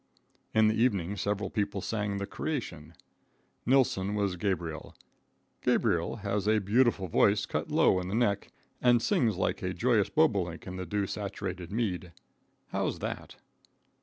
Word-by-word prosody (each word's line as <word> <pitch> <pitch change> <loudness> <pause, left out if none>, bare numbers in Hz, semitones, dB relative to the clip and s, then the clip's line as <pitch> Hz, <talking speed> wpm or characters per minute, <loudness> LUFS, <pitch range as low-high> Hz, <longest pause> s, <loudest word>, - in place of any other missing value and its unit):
In 110 0 +6
the 110 - +3
evening 100 -5 +1
several 100 0 -2
people 100 -2 -1
sang, 105 0 -2
"The 100 - -2
Creation." 95 - -5 0.7
Nilsson 110 -7 +2
was 100 -3 0
Gabriel. 85 -4 -3 0.7
Gabriel 85 0 +1
has 100 0 -1
a 110 0 +4
beautiful 105 -1 +2
voice 100 +5 +3
cut - - -3
low 95 - +4
in 90 - -4
the 95 - -2
neck, 105 -4 +1 0.3
and 120 -1 +5
sings 115 - +1
like - - -1
a 90 0 -2
joyous 115 -4 +2
bobolink 100 - +1
in 90 - -6
the 95 -1 -5
dew 100 +3 0
saturated 95 -3 -5
mead. 95 -6 -2 0.6
How's - - -1
that? - - -5
100 Hz, 145 wpm, -29 LUFS, 95-110 Hz, 0.7 s, In